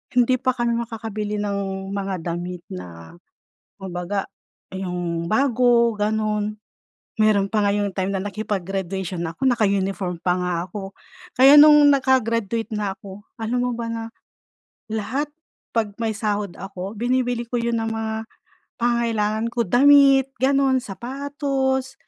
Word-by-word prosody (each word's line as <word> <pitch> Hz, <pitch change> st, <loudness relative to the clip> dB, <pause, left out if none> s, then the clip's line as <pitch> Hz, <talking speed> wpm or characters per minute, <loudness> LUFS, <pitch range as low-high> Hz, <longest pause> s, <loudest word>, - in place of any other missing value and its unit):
hindi 250 Hz, +1 st, +4 dB
pa 255 Hz, -, +1 dB
kami 240 Hz, -1 st, 0 dB
makakabili 220 Hz, -2 st, -4 dB
ng 195 Hz, -1 st, -3 dB
mga 195 Hz, -1 st, -2 dB, 0.2 s
damit 175 Hz, 0 st, -6 dB
na 85 Hz, -2 st, -9 dB, 0.7 s
kung 190 Hz, -, -6 dB
baga, 185 Hz, +3 st, -2 dB, 0.5 s
yung 175 Hz, -3 st, -3 dB
bago, 240 Hz, -1 st, +3 dB
ganun. 210 Hz, 0 st, -1 dB, 0.6 s
Meron 215 Hz, -2 st, +4 dB
pa 215 Hz, -, +2 dB
nga -, -, +3 dB
yung 205 Hz, -2 st, -1 dB
time 190 Hz, 0 st, -1 dB
na 190 Hz, -, -1 dB
nakipag-graduation 195 Hz, -3 st, -3 dB
ako, 165 Hz, +11 st, -4 dB
naka-uniform 195 Hz, -6 st, +1 dB
pa 180 Hz, -, +2 dB
nga 180 Hz, 0 st, -1 dB
ako. 195 Hz, 0 st, -7 dB, 0.4 s
Kaya 270 Hz, +3 st, +8 dB
nung 295 Hz, -1 st, +8 dB
naka-graduate 230 Hz, -5 st, +1 dB
na 205 Hz, -2 st, -2 dB
ako, 200 Hz, +1 st, -11 dB, 0.2 s
alam 230 Hz, +2 st, -1 dB
mo 245 Hz, 0 st, 0 dB
ba 235 Hz, -, -3 dB
na 230 Hz, 0 st, -4 dB, 0.9 s
lahat 230 Hz, +7 st, -2 dB, 0.4 s
'pag 220 Hz, -3 st, 0 dB
may 225 Hz, -, +1 dB
sahod 205 Hz, -2 st, -2 dB
ako, 195 Hz, +1 st, -7 dB
binibili 245 Hz, -1 st, 0 dB
ko 245 Hz, -, -10 dB
yun 235 Hz, 0 st, 0 dB
ng 225 Hz, 0 st, -2 dB
mga 220 Hz, 0 st, -3 dB, 0.7 s
pangangailangan 230 Hz, -2 st, 0 dB
ko. 235 Hz, -2 st, 0 dB
Damit, 275 Hz, +1 st, +6 dB
ganun. 270 Hz, -1 st, +3 dB
Sapatos, 265 Hz, +4 st, -2 dB
215 Hz, 135 wpm, -22 LUFS, 195-245 Hz, 0.9 s, Kaya